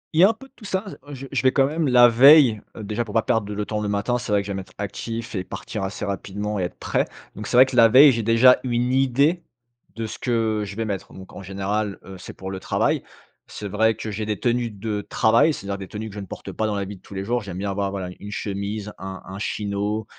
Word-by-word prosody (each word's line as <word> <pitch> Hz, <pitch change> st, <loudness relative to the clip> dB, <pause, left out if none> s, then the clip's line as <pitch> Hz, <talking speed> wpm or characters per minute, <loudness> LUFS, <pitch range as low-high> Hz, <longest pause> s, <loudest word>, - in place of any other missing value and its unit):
Il -, -, +3 dB
y -, -, +8 dB
a 195 Hz, -, +8 dB
un -, -, +1 dB
peu 225 Hz, +4 st, -14 dB
de 265 Hz, -, -38 dB
tout -, -, -17 dB
ça, 190 Hz, 0 st, -2 dB, 0.2 s
heu, 145 Hz, -, -6 dB
je 135 Hz, +1 st, -8 dB
je -, -, 0 dB
vais 130 Hz, -, +4 dB
quand 135 Hz, 0 st, +3 dB
même 155 Hz, +2 st, -1 dB
la 125 Hz, -1 st, +7 dB
veille, 125 Hz, -2 st, +7 dB, 0.2 s
heu 110 Hz, -, -6 dB
déjà 105 Hz, +3 st, -2 dB
pour 110 Hz, -1 st, -9 dB
pas 115 Hz, -, +3 dB
perdre 110 Hz, -4 st, 0 dB
le 105 Hz, 0 st, -3 dB
temps 105 Hz, 0 st, -3 dB
le 105 Hz, -, -2 dB
matin, 105 Hz, +5 st, 0 dB
c'est 120 Hz, -, -5 dB
vrai 100 Hz, -1 st, +2 dB
que -, -, -14 dB
j'aime 100 Hz, -1 st, -3 dB
être 95 Hz, -1 st, -11 dB
actif 115 Hz, +3 st, -5 dB
et 95 Hz, -4 st, -2 dB
partir 105 Hz, +3 st, -6 dB
assez 95 Hz, +2 st, -4 dB
rapidement 100 Hz, +1 st, -3 dB
et -, -, 0 dB
être 90 Hz, -, -5 dB
prêt. -, -, 0 dB, 0.3 s
Donc 105 Hz, -, -6 dB
c'est 125 Hz, -, +1 dB
vrai 130 Hz, -, +9 dB
que 130 Hz, -1 st, -6 dB
la 115 Hz, -2 st, +8 dB
veille, 135 Hz, +5 st, +8 dB
j'ai 115 Hz, -2 st, -1 dB
déjà 115 Hz, +3 st, +5 dB
une 125 Hz, 0 st, 0 dB
idée 135 Hz, +6 st, +2 dB, 0.5 s
de 115 Hz, -1 st, -3 dB
ce 110 Hz, -, -7 dB
que 115 Hz, -3 st, 0 dB
je 100 Hz, -, -8 dB
vais 115 Hz, +1 st, -2 dB
mettre. 100 Hz, -3 st, -5 dB
Donc 95 Hz, 0 st, -12 dB
en -, -, -8 dB
général, 100 Hz, +2 st, -2 dB
heu, 95 Hz, -1 st, -9 dB
c'est -, -, -9 dB
pour 95 Hz, 0 st, -7 dB
le 95 Hz, -, -5 dB
travail. -, -, 0 dB, 0.5 s
C'est 105 Hz, -, -7 dB
vrai 110 Hz, +3 st, +2 dB
que 110 Hz, -, -6 dB
j'ai 105 Hz, +1 st, -3 dB
des 105 Hz, -1 st, -2 dB
tenues 120 Hz, -1 st, 0 dB
de 105 Hz, 0 st, -4 dB
travail, 115 Hz, +8 st, +3 dB
c'est-à-dire 100 Hz, -8 st, -5 dB
des 95 Hz, -, -7 dB
tenues 110 Hz, +3 st, -6 dB
que 100 Hz, -, -12 dB
je -, -, -5 dB
ne 100 Hz, -, -7 dB
porte -, -, -8 dB
pas 110 Hz, -, -1 dB
dans 105 Hz, -, -1 dB
la 100 Hz, -1 st, -2 dB
vie 100 Hz, -1 st, -9 dB
tous 100 Hz, -, -13 dB
les 95 Hz, 0 st, -3 dB
jours. 120 Hz, +3 st, 0 dB
J'aime 95 Hz, -4 st, -7 dB
bien 100 Hz, +1 st, -2 dB
avoir, 100 Hz, 0 st, -1 dB
voilà, 95 Hz, -2 st, -4 dB
une 105 Hz, +1 st, -8 dB
chemise, 100 Hz, +1 st, -4 dB
un 95 Hz, 0 st, -6 dB
un 95 Hz, +1 st, -8 dB
chino 105 Hz, +1 st, -2 dB
105 Hz, 275 wpm, -23 LUFS, 100-120 Hz, 0.5 s, vrai